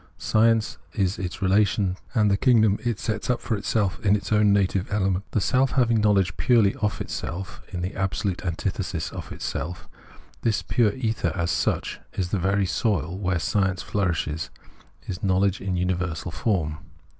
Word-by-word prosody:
Science 115 0 +2
is 95 -2 0
its 90 0 -4
realisation, 95 -1 +2 0.2
and 105 -3 +4
the - - +4
kingdom 110 -2 +4
it 120 -4 -1
sets 110 0 -3
up 125 - +2
for 115 - -1
itself 100 +1 -1
in 100 0 +4
its 100 0 -4
own 105 -1 +4
native 100 -1 +1
element. 95 -2 +1
A - - +3
self 130 +6 +2
having 120 -4 +3
knowledge 100 -3 +3
purely 115 -6 +4
of 105 -1 -1
itself 95 +3 -5
in 90 -3 -4
the 90 - -2
absp 95 +2 -2
lute 95 -1 -1
antithesis 90 -1 -2
of - - -8
itself, 85 +5 -5 0.5
this 115 -2 +1
pure 110 -4 +2
ether 110 -9 -1
as 85 -2 0
such, - - -1
is 90 -2 -2
the 100 - 0
very 100 +2 +2
soil 90 0 0
where 95 -2 0
science 95 +2 0
flourishes, 80 -6 -1 0.6
is 90 -1 -5
knowledge 95 0 +2
in 95 -2 -2
universal 90 -1 -1
form. 80 -6 -1
100 Hz, 170 wpm, -25 LUFS, 90-105 Hz, 0.6 s, and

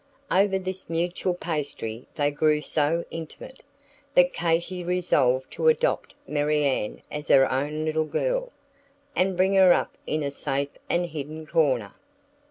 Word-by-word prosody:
Over 195 +1 +3
this 185 -1 -6
mutual 175 +2 -1
pastry 140 -9 -4
they 145 -2 +1
grew 150 +1 +2
so 160 +3 0
intimate, 165 +10 -8 0.5
that 270 0 +5
Katy 170 +2 -1
resolved 145 -8 +1
to 475 - -1
adopt 475 +1 +2
Marianne 145 -6 0
as 150 0 -5
her 135 -1 +6
own 150 +4 -1
little 155 0 0
girl, - - -1 0.6
and 185 0 +1
bring 190 +1 +3
her 190 -2 +7
up - - -1
in 155 0 -1
a 140 - -2
safe 140 0 -2 0.2
and 175 +1 +1
hidden 155 -1 -6
corner. 140 -10 +1
160 Hz, 140 wpm, -25 LUFS, 145-180 Hz, 0.6 s, her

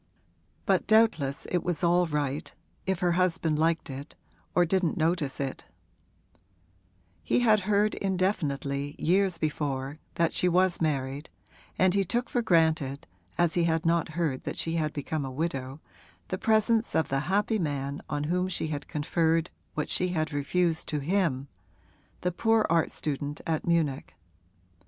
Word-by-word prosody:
But - - +2
doubtless 215 -12 +3
it 180 - +1
was 175 -2 -2
all 175 +1 +4
right, 145 -2 -2 0.4
if 190 -2 0
her 175 -1 +3
husband 170 -3 +1
liked 165 0 +1
it 140 +1 -8 0.4
or 175 - +5
didn't 180 -1 +1
notice 160 -4 0
it: 135 -2 -4 1.6
he 80 - +1
had 220 -3 +5
heard 210 +1 +3
indefinitely, 145 -7 -1
years 185 +1 +2
before, 145 -2 -2 0.2
that 170 -1 +1
she 180 - +2
was 180 0 +2
married, 140 -1 -1 0.5
and 185 -1 +4
he 200 0 +3
took 240 +7 -2
for 245 - +1
granted 160 - +2 0.3
(as 170 -2 +2
he 170 -1 +2
had 160 -1 0
not 165 0 +2
heard 150 -7 -1
that - - -4
she 165 - -2
had 155 -3 0
become 150 +1 -3
a 135 - -4
widow) 135 -1 -3 0.5
the 185 - -2
presence 220 +1 +2
of 160 - +2
the 135 - +1
happy 210 +3 +2
man 140 -3 -2
on 145 -1 -1
whom 180 +4 0
she 175 -3 -2
had 145 -2 -4
conferred 160 +2 0 0.2
what 150 - -1
she 180 - 0
had 160 -3 -1
refused 165 +3 0
to 150 - -1
him, 145 -3 0 0.7
the 180 - 0
poor 225 +4 +2
art 165 -1 +3
student 145 0 -4
at 160 0 -1
Munich. 145 - 0
165 Hz, 155 wpm, -28 LUFS, 145-180 Hz, 1.6 s, or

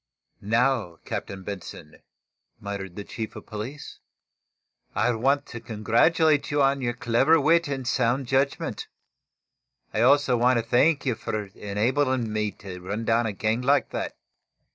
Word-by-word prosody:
"Now, 115 -4 +1
Captain 95 -1 -5
Benson," 100 -2 -8 0.6
muttered 100 -3 -6
the 105 - -6
chief 110 +2 -6
of - - -9
police, 115 +7 -7 1.0
"I 125 - +2
want 135 +5 +1
to 120 - -8
congratulate 120 +8 +2
you 145 - 0
on 135 0 +2
your 120 -2 -1
clever 130 +7 +3
wit 165 +3 +3
and 135 -3 -4
sound 125 +2 +1
judgment. 135 +2 -1 1.1
I 110 - +1
also 135 +1 +4
want 125 +1 +3
to 115 - -1
thank 140 +6 +3
you 130 - +2
for 110 -1 -4
enabling 115 +3 0
me 105 -1 0
to 95 -3 -10
run 105 +5 -4
down 115 +1 +2
a - - -1
gang 110 +4 -1
like 140 +3 +2
that. - - -4
120 Hz, 145 wpm, -25 LUFS, 105-135 Hz, 1.1 s, also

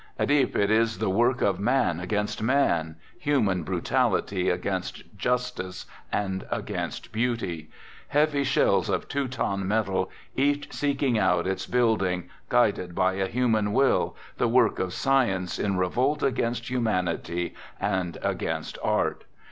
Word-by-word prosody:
At - - +1
Ypres, 145 -2 +3
it 100 +1 +2
is 115 0 +2
the 110 -3 0
work 120 +6 +2
of 95 -2 +1
man 105 -6 +1
against 105 +4 -2
man, 85 - +1
» - - -28
human 105 -11 +2
brutality 80 - 0
against - - -3
justice 125 -5 -2 0.3
and 95 -2 -1
against - - -4
beauty; 110 -9 -2 0.4
heavy 145 -1 +2
shells 135 - +2
of - - -1
Teuton 125 -8 -2
metal, 95 -3 0 0.3
each 145 +2 0
seeking 140 -5 +1
out 90 -4 +2
its 95 0 -2
building, 105 -8 +1 0.2
guided 90 -1 +2
by 95 0 +2
a 95 0 -1
human 110 -3 +1
will, 135 +3 +2 0.2
the 120 - +2
work 120 -1 +3
of 95 - 0
sci 135 +8 +2
ence 95 -3 -3
in 100 -2 0
revolt 125 +11 +1
against 120 -2 -1
humanity 90 -7 -1 0.3
and 95 -4 -1
against - - -2
art. - - 0
110 Hz, 140 wpm, -26 LUFS, 95-125 Hz, 0.4 s, Ypres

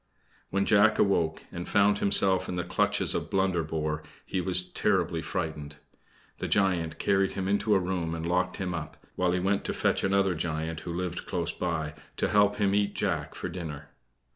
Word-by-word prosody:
When 100 0 0
Jack 110 +1 +4
awoke 85 -5 +1
and 85 0 -6
found 100 0 +3
himself 95 -2 +4
in 90 - -3
the 90 - -1
clutches - - +1
of - - -3
Blunderbore 80 -5 0 0.2
he 95 - -2
was 90 0 +2
terribly 80 -1 0
frightened. 80 -5 -4 0.6
The - - -2
giant 90 -5 +1
carried 95 -1 +1
him 95 -1 -3
into 100 +1 +2
a - - +4
room 90 -3 -2
and 80 0 -5
locked 90 +1 0
him 95 -3 -3
up, 80 -3 -6 0.2
while 90 -1 +1
he 90 - +1
went 100 +2 0
to - - -1
fetch - - +1
another 95 -1 +2
giant 80 -1 -3
who 85 - -6
lived 90 0 -4
close 85 -2 -1
by 80 -4 -3 0.2
to - - +1
help 105 0 +4
him 100 -2 +1
eat 100 0 +1
Jack - - -2
for - - -4
dinner. 80 -5 -7
90 Hz, 185 wpm, -28 LUFS, 80-95 Hz, 0.6 s, Jack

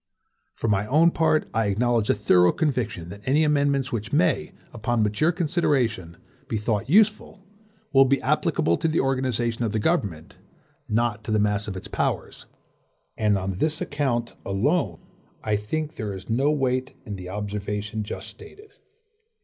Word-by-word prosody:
For - - -3
my 105 -1 +1
own 160 +6 +4
part 160 -1 +2
I 110 -1 +1
acknowledge 115 +2 +1
a - - +4
thorough 90 -4 +4
conviction 115 - -2
that 100 +2 -9
any 145 +4 +4
amendments 140 -3 +1
which 110 -3 -4
may, - - +1 0.2
upon 115 0 0
mature 105 +11 +2
consideration, 135 - 0 0.3
be 110 - -2
thought 105 +2 -1
useful, 210 +1 +2 0.5
will 135 0 +7
be 135 +1 +2
applicable 85 +1 +1
to - - 0
the 160 +1 +1
organization 125 -3 0
of 110 -2 -1
the - - +1
government, 105 - -1 0.5
not 110 -1 0
to - - -7
the 110 - +3
mass 105 0 +1
of 95 -2 -4
its - - -8
powers; - - -3 0.7
and 105 -2 +2
on 95 0 -3
this 155 +3 0
account 130 -5 -1
alone, 100 - 0 0.4
I 105 -1 +1
think 150 +10 -3
there 105 -4 -3
is 95 +3 -8
no 135 +6 +2
weight 130 -2 -1
in 105 -4 -5
the 90 -1 -8
observation 105 +1 -4
just 105 - -6
stated. 420 0 -13
115 Hz, 160 wpm, -24 LUFS, 105-140 Hz, 0.7 s, will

